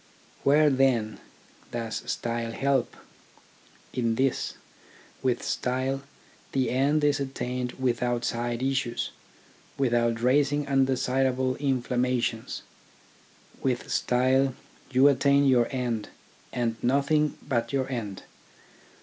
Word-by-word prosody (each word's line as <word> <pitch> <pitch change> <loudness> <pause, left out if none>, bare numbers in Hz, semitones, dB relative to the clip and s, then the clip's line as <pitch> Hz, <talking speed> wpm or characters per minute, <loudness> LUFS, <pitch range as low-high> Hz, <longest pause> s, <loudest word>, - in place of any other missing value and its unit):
Where, 150 +1 +5
then, 130 -5 +2 0.5
does 115 -2 -3
style 115 -1 -3
help? 135 0 0 1.0
In 115 -2 0
this, 135 +1 0 0.7
with 125 -2 0
style 130 +2 -1 0.5
the 130 -1 +1
end 140 +4 +2
is 145 -1 +3
attained 125 -2 -3
without 120 -1 0
side 120 +1 -2
issues, 130 -3 -1 0.7
without 120 -3 +1
raising 140 +4 +2
undesirable 130 -1 +1
inflammations. 125 -3 -1 1.0
With 125 -2 -1
style 130 +1 +2 0.3
you 130 +1 +5
attain 140 +1 +4
your 125 -3 +4
end 120 -5 -2 0.4
and 115 -2 -1
nothing 140 +4 +2
but 120 -4 0
your 135 -1 0
end. 110 -7 -5
130 Hz, 100 wpm, -27 LUFS, 120-135 Hz, 1.0 s, Where